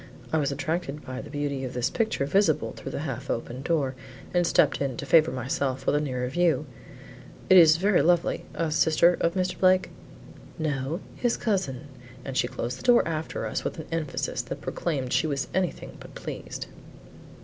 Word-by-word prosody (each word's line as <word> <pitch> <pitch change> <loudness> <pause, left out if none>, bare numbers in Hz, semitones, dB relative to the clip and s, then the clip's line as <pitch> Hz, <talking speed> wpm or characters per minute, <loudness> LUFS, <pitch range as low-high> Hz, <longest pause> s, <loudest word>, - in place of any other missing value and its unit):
"I 160 - +3
was 140 -1 0
attracted 150 +1 -3
by 130 0 -5
the 150 - -10
beauty 145 -2 -2
of 130 -1 -5
this 125 +1 0
picture 220 -11 0
visible 170 +1 +2
through - - -8
the - - -4
half - - -5
open 125 +2 -3
door 140 -4 0 0.4
and 175 -1 +3
stepped 150 -4 +3
in 135 -4 -1
to - - -5
favor 155 +3 +5
myself 130 0 -2
with - - +2
a 145 - +2
nearer 125 -4 -2
view. 155 0 +1 0.9
It 185 - +9
is 160 -2 +8
very 195 +2 +3
lovely. 175 0 +2
A 165 -2 -1
sister 160 +3 +4
of 170 +2 +1
Mr. 185 -1 -1
Blake?" 185 0 +4 0.7
"No, 155 +1 -2
his 240 -1 0
cousin;" 160 - -1 0.4
and 135 - -5
she 120 - +2
closed 120 +1 -4
the - - -11
door 245 -6 +5
after 160 -1 -3
us - - -3
with - - -3
an 160 - -6
emphasis 165 -3 -2
that - - -7
proclaimed 135 -7 -2
she 160 - +2
was 140 -3 -2
anything 185 -1 -2
but - - -12
pleased. - - -6
155 Hz, 185 wpm, -26 LUFS, 135-175 Hz, 0.9 s, It